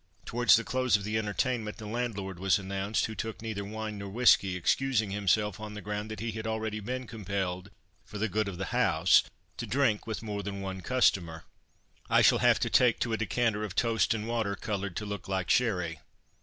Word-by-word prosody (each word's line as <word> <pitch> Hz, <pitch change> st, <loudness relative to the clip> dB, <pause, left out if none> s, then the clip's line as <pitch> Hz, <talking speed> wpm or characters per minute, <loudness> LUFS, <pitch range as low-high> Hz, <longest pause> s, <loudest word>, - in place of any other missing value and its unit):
Towards 120 Hz, -3 st, +5 dB
the 115 Hz, -, +1 dB
close 130 Hz, -3 st, +2 dB
of 100 Hz, -, -8 dB
the 110 Hz, +2 st, -1 dB
entertainment 110 Hz, +1 st, -2 dB
the 110 Hz, -, -8 dB
landlord 105 Hz, -5 st, -3 dB
was 95 Hz, 0 st, +3 dB
announced, 100 Hz, +2 st, -1 dB
who 110 Hz, -, -5 dB
took 110 Hz, 0 st, -5 dB
neither 110 Hz, -3 st, -4 dB
wine 110 Hz, 0 st, -5 dB
nor 100 Hz, 0 st, -6 dB
whisky, 100 Hz, -4 st, +4 dB
excusing 110 Hz, +4 st, +1 dB
himself 105 Hz, 0 st, +1 dB
on 105 Hz, -1 st, -7 dB
the -, -, -5 dB
ground 105 Hz, +2 st, -4 dB
that 110 Hz, -, -6 dB
he 115 Hz, 0 st, -2 dB
had 110 Hz, +1 st, -5 dB
already 110 Hz, -1 st, -2 dB
been 125 Hz, +5 st, -4 dB
compelled 100 Hz, -4 st, -4 dB, 0.3 s
"for 105 Hz, -, -9 dB
the 110 Hz, +2 st, 0 dB
good 105 Hz, +1 st, -1 dB
of 95 Hz, -3 st, -5 dB
the 95 Hz, -1 st, -4 dB
house" -, -, +4 dB, 0.4 s
to -, -, -5 dB
drink 125 Hz, -6 st, +1 dB
with 110 Hz, 0 st, -4 dB
more 105 Hz, -2 st, -3 dB
than 100 Hz, 0 st, -5 dB
one 95 Hz, -1 st, -5 dB
customer. 90 Hz, -9 st, +1 dB, 0.7 s
"I -, -, +5 dB
shall -, -, +5 dB
have -, -, +4 dB
to -, -, +1 dB
take 125 Hz, -3 st, +4 dB
to 115 Hz, -, 0 dB
a -, -, +1 dB
decanter 115 Hz, -1 st, 0 dB
of 100 Hz, -3 st, -5 dB
toast 115 Hz, 0 st, +2 dB
and 110 Hz, 0 st, -4 dB
water, 115 Hz, -4 st, -1 dB
coloured 100 Hz, -3 st, -4 dB
to 105 Hz, -, -3 dB
look 100 Hz, -3 st, -6 dB
like 95 Hz, -3 st, -1 dB
sherry. 90 Hz, -, +1 dB
105 Hz, 210 wpm, -29 LUFS, 100-115 Hz, 0.7 s, Towards